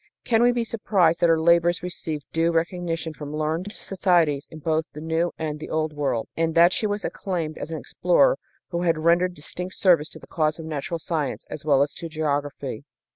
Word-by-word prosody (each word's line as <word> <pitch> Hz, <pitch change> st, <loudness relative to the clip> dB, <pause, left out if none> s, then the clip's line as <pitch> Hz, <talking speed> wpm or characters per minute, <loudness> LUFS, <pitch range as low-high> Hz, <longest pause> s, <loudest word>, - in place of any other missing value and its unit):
Can 225 Hz, -1 st, +2 dB
we 245 Hz, 0 st, +6 dB
be 240 Hz, -1 st, 0 dB
surprised 190 Hz, -7 st, +2 dB
that 170 Hz, -, +4 dB
her 165 Hz, -1 st, +4 dB
labors 170 Hz, +1 st, +3 dB
received 160 Hz, -4 st, -4 dB
due 165 Hz, +1 st, +2 dB
recognition 165 Hz, -1 st, -1 dB
from 150 Hz, -1 st, -7 dB
learned 160 Hz, +6 st, -2 dB
societies 175 Hz, -9 st, +1 dB
in 160 Hz, -, -10 dB
both 155 Hz, +1 st, 0 dB
the 150 Hz, -, -8 dB
New 160 Hz, +2 st, 0 dB
and 155 Hz, -2 st, -3 dB
the -, -, -7 dB
Old 155 Hz, -1 st, -1 dB
World, 135 Hz, -6 st, -1 dB
and 165 Hz, 0 st, 0 dB
that 170 Hz, +2 st, +6 dB
she 215 Hz, -, 0 dB
was 205 Hz, 0 st, -2 dB
acclaimed 170 Hz, -5 st, -3 dB
as -, -, -5 dB
an 160 Hz, -, -3 dB
explorer -, -, +2 dB, 0.3 s
who 170 Hz, -1 st, -2 dB
had 165 Hz, -2 st, +2 dB
rendered 175 Hz, +2 st, +3 dB
distinct 180 Hz, +5 st, -5 dB
service 170 Hz, -5 st, +4 dB
to -, -, -11 dB
the -, -, -13 dB
cause 155 Hz, -1 st, 0 dB
of 165 Hz, -, -8 dB
natural 155 Hz, +1 st, -3 dB
science, 155 Hz, -3 st, -3 dB
as 150 Hz, -1 st, -7 dB
well 140 Hz, -2 st, +5 dB
as 145 Hz, -, -3 dB
to 165 Hz, -, -7 dB
geography? 145 Hz, -2 st, -2 dB
165 Hz, 205 wpm, -24 LUFS, 155-175 Hz, 0.3 s, we